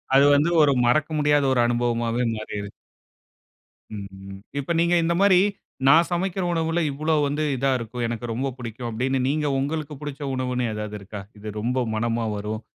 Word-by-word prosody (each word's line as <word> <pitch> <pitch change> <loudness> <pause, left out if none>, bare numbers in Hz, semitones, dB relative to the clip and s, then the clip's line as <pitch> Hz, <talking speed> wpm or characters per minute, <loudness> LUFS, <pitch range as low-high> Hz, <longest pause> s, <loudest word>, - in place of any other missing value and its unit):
அது 140 +1 +7
வந்து, 150 +4 +3
ஒரு 145 -2 +5
மறக்க 150 +6 +2
முடியாத 145 -1 +3
ஒரு 125 - +1
அனுபவமாவே 120 0 0
மாறிருது. 105 -1 -6 1.2
ம் 95 -1 -9 0.2
இப்ப 140 +4 -3
நீங்க 170 +1 +3
இந்த 170 - +1
மாரி, 190 -3 +6 0.5
நான் 165 +4 +6
சமைக்கிற 185 +2 -1
உணவுல, 165 0 0
"இவ்வளவு 155 +2 +1
வந்து 145 +2 -1
இதா 135 +1 +1
இருக்கும், 120 +1 -5
எனக்கு 120 +1 -4
ரொம்ப 135 +4 -2
பிடிக்கும்." 120 0 -6
அப்படினு, 130 +4 -1
நீங்க 150 +1 0
உங்களுக்கு 150 +2 -3
பிடிச்ச 145 0 -6
உணவு 130 -1 -2
என்னு 125 -2 0
ஏதாவது 105 0 -5
இருக்கா? 100 +1 -8 0.2
இது 105 - -9
ரொம்ப 125 +2 0
மனமா 115 +1 0
வரும். 105 +1 -4
130 Hz, 165 wpm, -24 LUFS, 115-150 Hz, 1.2 s, அது